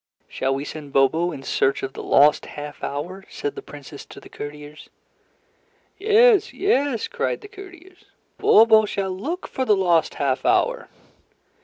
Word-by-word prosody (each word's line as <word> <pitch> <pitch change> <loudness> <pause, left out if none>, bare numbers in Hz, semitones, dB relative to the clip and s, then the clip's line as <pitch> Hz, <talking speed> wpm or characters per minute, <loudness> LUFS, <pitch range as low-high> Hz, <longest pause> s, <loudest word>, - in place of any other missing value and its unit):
"Shall 135 0 -2
we 140 +2 -4
send 145 -2 -9
Bobo 160 +6 +2
in 135 -4 -9
search 135 0 0
of 135 - -4
the - - -7
lost 145 +2 +3
half 145 0 -9
hour?" 175 +7 -5
said 145 - -4
the - - -8
Princess 145 0 -11
to - - -12
the - - -15
courtiers. 150 +1 -10 1.1
"Yes! 435 0 +4
Yes!" 285 - 0
cried 480 0 -3
the 415 - -11
courtiers. 375 -3 -14 0.3
"Bobo 220 0 +6
shall 195 -2 -3
look 295 - -5
for 260 - -3
the 215 -5 +3
lost 175 -4 +1
half 135 -2 -1
hour." - - +1
185 Hz, 155 wpm, -22 LUFS, -, 1.1 s, Bobo